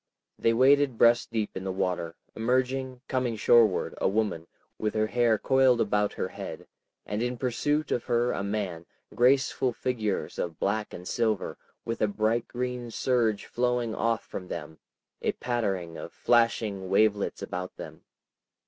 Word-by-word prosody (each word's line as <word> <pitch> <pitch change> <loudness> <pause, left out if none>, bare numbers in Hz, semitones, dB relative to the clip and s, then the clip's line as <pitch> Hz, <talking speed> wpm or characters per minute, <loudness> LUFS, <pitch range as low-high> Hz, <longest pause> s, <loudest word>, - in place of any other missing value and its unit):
They 115 - +3
waded 135 +1 +4
breast 120 +1 +4
deep 110 -2 -2
in 95 - -4
the 95 - -2
water, 90 -3 -2 0.2
emerging, 130 +2 0
coming 125 -3 0
shoreward, 110 -1 +4
a - - +3
woman, 100 -5 -1 0.3
with 105 0 -1
her 110 0 +2
hair 115 0 +2
coiled 130 0 +3
about 105 -1 +1
her - - -3
head, - - -7 0.4
and 105 +1 -3
in 125 +1 -1
pursuit 145 +5 0
of 120 - 0
her 120 0 +2
a - - -2
man, 100 -5 -3 0.3
graceful 130 0 +3
figures 115 -5 -2
of 85 -3 -3
black 105 +2 -1
and 90 +1 -8
silver, 110 -4 0 0.3
with 115 - -3
a 105 - +4
bright 110 +3 0
green 125 -1 -4
surge 115 -3 +1
flowing 125 -2 0
off 115 0 0
from 90 - -7
them, 80 -2 -7 0.4
a - - 0
pattering 95 -9 -2
of - - -7
flashing 110 -5 +1
wavelets 105 +1 +2
about 90 +1 -5
them. - - -9
115 Hz, 155 wpm, -28 LUFS, 100-125 Hz, 0.4 s, waded